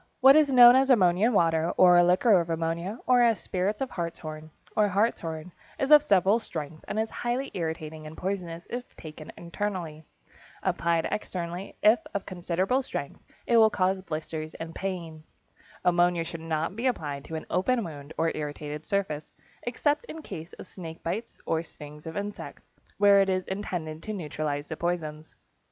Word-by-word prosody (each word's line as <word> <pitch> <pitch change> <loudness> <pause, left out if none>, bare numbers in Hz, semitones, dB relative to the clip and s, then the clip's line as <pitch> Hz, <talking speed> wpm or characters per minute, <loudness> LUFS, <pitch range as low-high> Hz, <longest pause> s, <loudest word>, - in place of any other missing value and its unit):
= - - -45
What 270 +2 +8
is 305 -2 +5
known 245 -1 +9
as 265 +1 +4
ammonia 195 -2 +4
water, 165 -5 +2
or 180 -1 +7
liquor 185 +4 +5
of 170 - -6
ammonia, 165 +5 -2
or 250 -1 +5
as 230 -3 +4
spirits 195 +5 -2
of 265 - -2
hartshorn, 155 -2 -5 0.3
or 210 -1 +4
hartshorn, 180 -5 -1 0.3
is 270 +2 -1
of 300 -1 +10
several 200 -4 +3
strengths 155 -7 -7
and 215 - -2
is 220 0 -1
highly 250 +3 -2
irritating 160 -2 -4
and 155 - -10
poisonous 175 -3 -4
if 245 +1 -6
taken 155 -1 -10
internally. 170 -4 -4 0.6
Applied 170 -1 +1
externally, 180 -2 -4
if 215 +2 +6 0.2
of 200 - -2
considerable 185 +7 0
strength, 265 - -6 0.2
it 235 - +3
will 220 -1 +7
cause 190 -1 0
blisters 155 -2 -5
and 165 0 -7
pain. 170 -5 -5 0.6
Ammonia 175 -1 +3
should 165 0 -7
not 165 +2 -2
be 235 +4 -1
applied 145 - -2
to 160 - -6
an 155 - -5
open 230 +7 +1
wound 145 -4 -8
or 165 0 +1
irritated 150 0 -5
surface, 175 -7 -1 0.3
except 290 - 0
in 320 -8 -9
case 165 -3 -8
of - - -10
snake 165 -4 -10
bites 220 +8 -4
or 160 0 0
stings 150 -1 -12
of 160 - -6
insects, 205 0 -6 0.3
where 200 -1 +6
it 195 - +1
is 185 -1 0
intended 175 -5 -4
to 215 - -5
neutralize 150 -5 -3
the 160 - -5
poisons. 160 -2 -4
175 Hz, 170 wpm, -27 LUFS, 160-210 Hz, 0.6 s, of